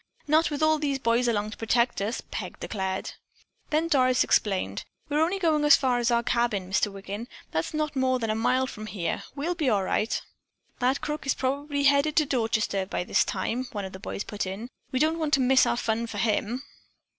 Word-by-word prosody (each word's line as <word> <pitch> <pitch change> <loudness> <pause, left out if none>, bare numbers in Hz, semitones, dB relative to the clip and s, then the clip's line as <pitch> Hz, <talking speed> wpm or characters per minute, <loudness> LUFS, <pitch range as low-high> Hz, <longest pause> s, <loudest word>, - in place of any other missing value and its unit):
"Not 315 +3 +3
with 295 0 -2
all 310 0 +4
these 285 -2 0
boys 235 -1 +1
along 210 -2 0
to - - -9
protect 235 -1 +1
us," 210 +4 -2
Peg - - -5
declared. 190 -2 -3 0.6
Then 315 +2 +1
Doris 255 -5 +3
explained: 195 -3 0 0.3
"We're 295 +1 +1
only 350 +5 +2
going 320 -5 +2
as 295 - +8
far 255 -2 +1
as 240 0 +1
our 235 0 +2
cabin. 235 -6 0
Mr. 205 +1 +2
Wiggin; 200 +3 -6 0.2
that's 160 - -1
not 305 -1 -2
more 260 -1 +2
than 225 -3 -1
a - - 0
mile 255 +4 +2
from 215 -4 -7
here. 180 -6 -3
We'll 305 +5 -1
be 310 -6 0
all 205 -4 +2
right." 215 +4 0 0.6
"That 255 +2 +1
crook 300 -2 -4
is 275 - +2
probably 285 +2 -1
headed 285 +3 +3
for 305 - +5
Dorchester 220 -6 0
by 180 - -2
this - - +2
time," 235 +7 -2
one 205 -2 -3
of 190 - -8
the 190 - -8
boys 200 - -4
put 205 -2 -4
in. 205 +6 -6 0.2
"We 260 - -1
don't 315 +4 +2
want 310 -2 +2
to - - -1
miss 260 0 +5
our - - +1
fun 230 0 -1
for - - -6
him." 230 +3 0
250 Hz, 215 wpm, -27 LUFS, 215-285 Hz, 0.6 s, as